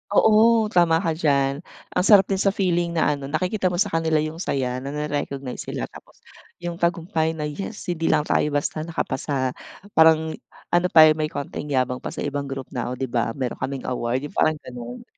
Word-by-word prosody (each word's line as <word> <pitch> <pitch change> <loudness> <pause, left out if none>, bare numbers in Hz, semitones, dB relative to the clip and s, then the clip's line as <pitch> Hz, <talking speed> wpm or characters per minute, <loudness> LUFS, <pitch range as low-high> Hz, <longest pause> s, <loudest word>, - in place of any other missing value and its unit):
Oo, 220 0 +5
tama 170 -2 +3
ka 165 - +1
diyan. 140 -3 +1 0.3
Ang - - +1
sarap 205 -3 +8
din 190 - +1
sa 195 0 +2
feeling 175 -3 0
na 160 - +3
ano 140 -2 -4
nakikita 185 +6 0
mo 180 - -1
sa 200 +3 +1
kanila 160 -2 +1
yung 155 +1 -5
saya 130 -7 -1
nare-recognize 140 -1 -4
sila - - -4
tapos, - - -16 0.4
yung 175 0 -4
tagumpay 165 -2 0
na 150 - -4
"Yes 190 +8 -5
hindi 165 -1 -2
lang 150 - +3
tayo 150 - +1
basta 145 +2 -1
nakapasa". 130 -4 -2 0.4
Parang 160 -1 +5 0.4
ano 175 +1 +3
pa 155 -2 +8
may 155 0 -1
konting 145 0 -6
yabang 125 -1 0
pa - - -7
sa - - -4
ibang 145 -1 -3
group 135 -1 -6
na 120 -3 -3
o 125 - -3
di 135 - -5
ba 120 -2 -1
meron 130 -3 -3
kaming 135 -1 -4
award, 125 +1 -2
yung - - -24
parang 155 0 +3
ganun. 120 0 -8
155 Hz, 195 wpm, -23 LUFS, 135-170 Hz, 0.4 s, sarap